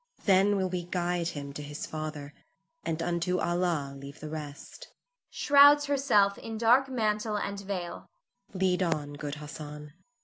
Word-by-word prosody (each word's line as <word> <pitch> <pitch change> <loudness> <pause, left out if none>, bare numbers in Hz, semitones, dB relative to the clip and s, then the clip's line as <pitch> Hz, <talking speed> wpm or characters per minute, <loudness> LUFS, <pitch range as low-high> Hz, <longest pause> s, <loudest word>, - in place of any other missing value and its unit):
Then 195 +1 +5
will 190 -1 +1
we 180 -1 -3
guide 175 -1 -1
him 140 -4 -5
to 150 - -6
his 145 +1 -6
father, 155 -2 -6 0.5
and 165 0 -2
unto 175 +1 0
Allah 175 -5 0
leave 140 +2 -10
the 155 0 -7
rest 150 -2 -8 0.4
[shrouds 290 +1 +6
herself 245 -9 +3
in 225 -1 -6
dark 245 +4 +4
mantle 215 -3 0
and 200 -1 -3
veil]. 190 -3 -5 0.4
Lead 185 -1 +1
on, 155 -5 -1
good 145 0 -5
Hassan. 150 0 -9
175 Hz, 145 wpm, -29 LUFS, 150-205 Hz, 0.5 s, shrouds